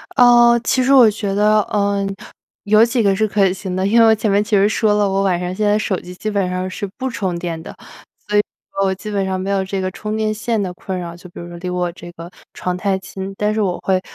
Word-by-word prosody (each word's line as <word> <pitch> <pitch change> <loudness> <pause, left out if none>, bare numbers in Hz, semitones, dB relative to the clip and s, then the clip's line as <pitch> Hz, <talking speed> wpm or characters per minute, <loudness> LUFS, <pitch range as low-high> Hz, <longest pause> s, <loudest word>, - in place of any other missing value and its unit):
呃， 240 -1 +6
其 255 - +1
实 265 - +2
我 245 -5 +7
觉 205 -2 -3
得， 210 +1 +4
嗯， 200 -1 0 0.6
有 215 +2 +5
几 235 0 +1
个 200 -1 +3
是 215 +2 +1
可 195 -2 +2
行 190 -1 -5
的， 185 +1 0
因 230 +4 +3
为 230 - +7
我 220 - +6
前 215 0 -1
面 200 +1 +3
其 210 0 0
实 195 +1 +4
说 215 0 +1
了， 205 -1 +2
我 195 0 0
晚 180 -3 +1
上 180 0 -3
现 210 +3 -1
在 205 0 +3
手 200 -3 -1
机 180 0 -11
基 215 +4 -4
本 195 -3 0
上 185 +1 -3
是 200 +2 -5
不 260 +1 -3
充 190 -7 -3
电 170 -2 -5
的。 - - -10 0.5
所 210 0 +1
以 - - +6 0.4
我 190 - +1
基 210 +3 -8
本 200 -1 0
上 190 0 -2
没 190 +1 -4
有 195 -1 +1
这 190 0 -4
个 185 - -2
充 210 +3 -5
电 215 0 0
线 220 0 -2
的 180 -2 -3
困 185 +1 -5
扰， 170 -1 -6
就 175 +1 -13
比 - - -12
如 170 - -8
说 175 0 -9
离 180 +1 -5
我 180 -1 -1
这 175 0 -11
个 170 +1 -10 0.2
床 180 -1 -3
太 195 +1 0
近， 190 +1 -7
但 210 0 0
是 215 - 0
我 180 -3 0
会 190 -1 +1
195 Hz, 295 characters per minute, -18 LUFS, 185-215 Hz, 0.6 s, 我